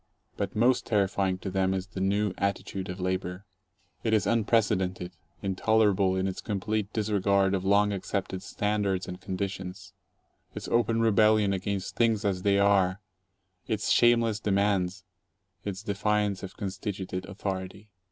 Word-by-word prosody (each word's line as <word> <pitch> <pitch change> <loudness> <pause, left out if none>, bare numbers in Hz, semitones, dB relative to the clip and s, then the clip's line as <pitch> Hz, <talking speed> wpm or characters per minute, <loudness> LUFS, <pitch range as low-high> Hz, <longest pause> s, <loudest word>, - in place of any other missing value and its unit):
But - - -3
most 120 +3 +3
terrifying 100 -3 +1
to 95 +1 -5
them 95 0 +1
is 95 -1 -3
the 95 -1 -7
new 100 +1 +1
attitude 100 -1 -2
of 90 +1 -5
labor. 95 +1 -3 0.6
It 110 - +1
is 105 - +1
unprecedented, 100 -5 +1 0.3
intolerable 100 -1 +2
in 95 0 0
its 95 - -4
complete 105 0 -2
disregard 100 -2 +2
of 95 -1 0
long 100 +1 +3
accepted 95 -1 -3
standards 105 -3 -1
and 90 - -7
conditions, 95 0 -5 0.6
its - - -6
open 115 -1 +2
rebellion 110 -2 +4
against 95 0 -3
Things 115 -3 +2
as 95 -3 0
They 100 +1 +3
Are, 100 -1 +3 0.7
its 110 -1 -1
"shameless 115 -2 +4
demands," 100 -3 0 0.6
its 100 0 -4
defiance 105 -1 0
of 95 - -8
constituted 95 -2 -4
authority. 95 +1 -5
100 Hz, 135 wpm, -28 LUFS, 95-105 Hz, 0.7 s, rebellion